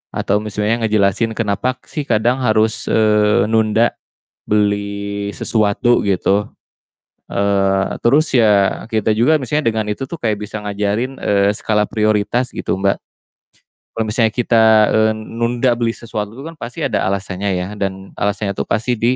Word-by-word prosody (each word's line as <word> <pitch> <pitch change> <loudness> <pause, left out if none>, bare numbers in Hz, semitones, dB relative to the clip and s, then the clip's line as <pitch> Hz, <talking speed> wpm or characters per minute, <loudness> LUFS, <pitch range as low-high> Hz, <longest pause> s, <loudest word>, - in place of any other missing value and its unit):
atau 105 +1 0
misalnya 105 +2 -1
ngejelasin 105 +2 +1
kenapa 115 +3 -1
sih, 150 - -4
kadang 120 +3 +1
harus, 110 -1 +1
eee, 105 -1 +3
nunda 110 +1 +2 0.6
beli 100 -1 -1
sesuatu 110 +2 +1
gitu, 100 +1 +1 0.8
eee, 100 -1 +1
terus 145 +7 +3
ya, 105 -4 +3
kita 110 -1 +1
juga 155 +7 +4
misalnya 145 0 0
dengan 110 -1 -2
itu 105 +6 -3
tuh, 170 - -5
kayak 110 -3 +1
bisa 105 +1 -5
ngajarin, 105 +6 -2
eee, 100 0 +2
skala 105 0 0
prioritas 110 +3 0
gitu, - - -2
Mbak. 100 0 +1 1.0
Kalau 110 - 0
misalnya 110 +1 +2
kita, 115 -2 +3 0.3
eee, 110 0 +3
nunda 120 +3 -1
beli 115 -1 0
sesuatu 105 -3 -5
itu 135 - -9
kan 165 - -7
pasti 120 +1 -6
ada - - 0
alasannya 100 0 -2
ya 90 - -3
dan 95 0 -4
alasannya 100 0 -1
tuh - - -3
pasti 115 +4 0
di, 120 +3 +2
110 Hz, 145 wpm, -18 LUFS, 100-115 Hz, 1.0 s, juga